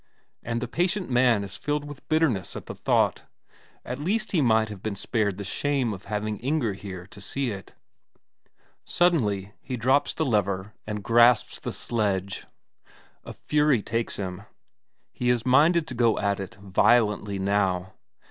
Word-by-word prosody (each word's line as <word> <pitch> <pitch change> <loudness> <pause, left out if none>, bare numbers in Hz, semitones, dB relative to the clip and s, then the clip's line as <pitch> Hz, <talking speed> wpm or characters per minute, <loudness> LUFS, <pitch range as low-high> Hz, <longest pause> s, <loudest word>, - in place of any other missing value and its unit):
And 115 0 -3
the 125 - -2
patient 180 - -1
man 120 -4 +4
is 100 - -8
filled 145 0 -2
with 145 -2 -11
bitterness 155 - +1
at - - -7
the - - -6
thought - - +1 0.6
at 125 +2 -5
least 215 +8 -1
he 170 - +2
might 110 -3 +3
have 105 -3 -8
been 110 -1 -3
spared 100 -2 -1
the 100 - -5
shame 130 +3 -1
of 95 - -10
having 105 0 -2
Inger 130 -5 0
here 95 -2 -8
to 100 +1 -11
see 130 +5 -2
it! 95 -1 -9 1.1
Suddenly 105 - +1
he 130 -2 -5
drops 130 +4 +2
the 160 - 0
lever 100 -4 0
and 105 -1 -4
grasps 120 0 +4
the - - -4
sledge. 100 -4 -2 0.8
A - - -8
fury 150 -7 +1
takes 115 +1 -2
him, 95 -2 -5 0.7
he 125 - -1
is 125 -1 +1
minded 155 +6 +4
to - - -5
go 115 -2 +2
at 100 -1 0
it 95 - -7
violently 105 +1 +2
now. 95 -1 0
110 Hz, 160 wpm, -26 LUFS, 100-135 Hz, 1.1 s, man